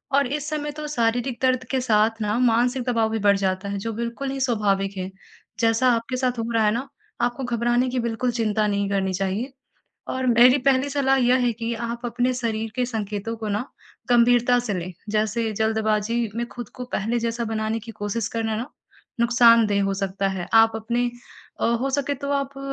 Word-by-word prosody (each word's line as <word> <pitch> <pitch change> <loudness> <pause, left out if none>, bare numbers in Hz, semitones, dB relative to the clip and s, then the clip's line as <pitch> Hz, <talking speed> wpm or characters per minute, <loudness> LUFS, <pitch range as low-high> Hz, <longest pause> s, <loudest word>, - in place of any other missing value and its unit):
और 280 -1 +3
इस 295 +3 -3
समय 295 -1 -3
तो 300 +1 -6
शारीरिक 240 -1 0
दर्द 255 -1 +2
के 265 -1 +1
साथ 220 -1 +2
न 210 +2 0
मानसिक 245 +2 +2
दबाव 225 -2 +2
भी 220 0 -2
बढ़ 200 -1 +4
जाता 190 0 -1
है 200 - -3
जो 225 - -2
बिल्कुल 235 +4 -4
ही 270 - -4
स्वाभाविक 200 -5 0
है 185 0 -3 0.5
जैसा 230 +2 +3
आपके 230 +2 -2
साथ 250 -2 -1
हो 230 +1 -2
रहा 225 -1 +3
है 210 - +4
ना 255 +4 -3 0.3
आपको 245 +2 -1
घबराने 240 +1 +1
की 250 0 -1
बिल्कुल 235 +2 -1
चिंता 220 -2 0
नहीं 200 -1 0
करनी 195 -1 0
चाहिए 195 +8 -2 0.6
और 260 0 -2
मेरी 245 +2 +6
पहली 270 0 +3
सलाह 270 -1 +2
यह 250 -1 +4
है 240 - +2
कि 230 +1 -4
आप 235 +1 -5
अपने 245 +2 0
शरीर 225 -3 -2
के 250 - +1
संकेतों 215 -1 -4
को 220 -1 -5
न 205 +3 -1 0.5
गंभीरता 245 0 +4
से 225 -5 -3
लें। 180 +1 -4 0.2
जैसे 220 +1 0
जल्दबाजी 220 +1 0 0.2
में 235 - -1
खुद 240 -3 -8
को 250 - -6
पहले 225 +4 0
जैसा 230 +1 -2
बनाने 220 0 -2
की - - -6
कोशिश 205 +1 -3
करना 225 -1 -1
न 235 +3 -3 0.5
नुकसानदेह 230 -3 +5
हो 195 0 0
सकता 195 0 -1
है। 190 -2 -4
आप 225 0 +6
अपने 240 +2 -1 0.5
अ, - - +2
हो 235 +4 0
सके 285 +1 0
तो 280 +1 -5
आप 275 -1 -2
230 Hz, 200 wpm, -23 LUFS, 215-250 Hz, 0.6 s, मेरी